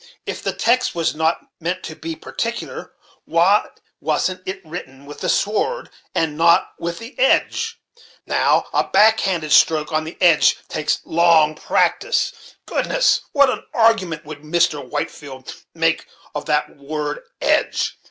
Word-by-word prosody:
If - - -5
the - - -1
text 250 -1 +1
was 165 -1 0
not 160 +2 0 0.2
meant 180 +2 -3
to 155 - -7
be 165 0 -6
particular, 230 +8 -5 0.3
why 180 +5 +3 0.3
wasn't 185 0 -1
it 190 +1 -4
written 140 -5 -9
with 145 +1 -10
the - - -2
sword, 220 - 0 0.2
and 160 -2 0
not 170 +2 +4
with 170 0 -4
the 230 +3 -10
edge? 465 -2 +1 0.5
Now, - - +2
a - - +3
back 220 +1 +5
handed 170 -6 -1
stroke, 155 0 +4
on 155 0 0
the 160 +2 -9
edge, 170 -4 +5
takes 155 -1 -1
long 165 -2 +4
practice. 475 - -1
Goodness! - - +1
what 280 -2 +4
an - - -5
argument 195 -9 +2
would 150 -1 -8
Mr. 155 -1 +1
Whitefield 140 -3 -6 0.2
make 165 0 +1 0.3
of 150 0 -5
that 150 -1 0
word 150 +1 -4 0.2
edge! - - 0
165 Hz, 145 wpm, -20 LUFS, 155-210 Hz, 0.5 s, back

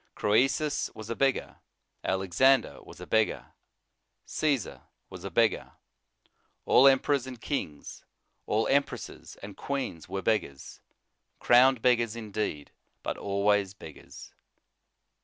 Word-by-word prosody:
Croesus 135 +8 +1
was 110 +1 -8
a - - -2
beggar, 135 0 0 0.5
Alexander 95 +9 +2
was - - -14
a - - -8
beggar, 110 -1 0 0.7
Caesar 140 -9 -2 0.3
was - - -10
a - - -5
beggar, - - +1 0.9
all 135 - +6
em 135 -1 +7
perors 135 -1 -1
and 125 -2 -8
kings, 80 - -5 0.4
all 110 +1 +1
empresses 140 +1 -2
and 100 0 -9
queens 130 - -5
were 95 0 -4
beggars; 105 -11 -2 0.6
crowned 125 0 +4
beggars 120 -3 +2
indeed, 105 -9 -4 0.3
but - - -3
always 100 0 0
beggars. 80 -6 -12
110 Hz, 115 wpm, -28 LUFS, 100-135 Hz, 0.9 s, em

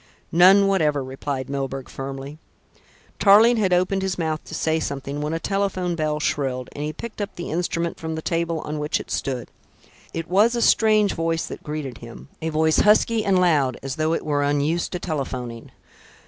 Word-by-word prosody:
"None 190 +4 +7
whatever," 155 -8 +2
replied 130 0 -4
Milburgh 135 -1 -4
firmly. 135 +2 -7 0.8
Tarling 220 +4 +6
had 195 -4 +1
opened 185 +2 +2
his 190 -2 -2
mouth 160 -2 -2
to - - -7
say 160 0 0
something, 140 -1 -4
when 150 +1 -2
a 165 - -1
telephone 195 -2 -1
bell 155 -2 -1
shrilled, 130 -4 -2
and 145 - -6
he 150 - -2
picked 215 +7 -8
up 205 0 -4
the 175 - -6
instrument 170 0 -2
from 160 0 -4
the 160 - -4
table 165 -1 -1
on 150 0 -4
which 150 +1 -1
it - - -9
stood. 130 -4 -3 0.6
It 165 0 -5
was 210 +6 +3
a 235 - 0
strange 215 -2 +4
voice 165 0 -1
that - - -8
greeted 150 -5 -5
him, 115 +3 -11
a 160 - -1
voice 155 0 +2
husky 215 +1 +4
and 195 -2 +3
loud, 145 -8 +2
as 135 -1 -4
though 155 +1 +1
it - - -4
were 145 -2 0
unused 145 +4 0
to 180 - -2
telephoning. 130 -8 -4
160 Hz, 190 wpm, -23 LUFS, 140-185 Hz, 0.8 s, None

